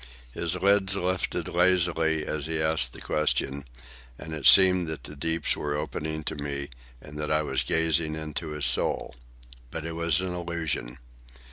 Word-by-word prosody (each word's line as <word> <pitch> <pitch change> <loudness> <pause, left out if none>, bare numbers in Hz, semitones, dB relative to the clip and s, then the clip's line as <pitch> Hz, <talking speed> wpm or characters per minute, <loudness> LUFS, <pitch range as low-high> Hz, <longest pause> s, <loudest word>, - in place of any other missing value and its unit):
His 85 -1 0
lids 100 0 +2
lifted 90 -1 -2
lazily 85 -3 +1
as 75 -1 -3
he 80 -1 -2
asked 80 0 +1
the - - -7
question, 70 -2 -1 0.5
and 80 - -9
it 75 -4 +1
seemed 90 -2 +7
that 80 -1 -6
the 75 - -9
deeps 80 +2 +1
were 75 0 -3
opening 75 +1 -4
to - - -4
me 70 -1 -4 0.3
and 75 +4 -11
that 75 - -3
I 75 0 +1
was - - -1
gazing 80 -1 +1
into 80 +1 -5
his 75 -1 0
soul. - - +4 0.6
But 80 +5 -7
it 85 - -5
was 85 0 +1
an 90 -1 -4
illusion. 85 -8 -4
80 Hz, 165 wpm, -26 LUFS, 75-85 Hz, 0.6 s, seemed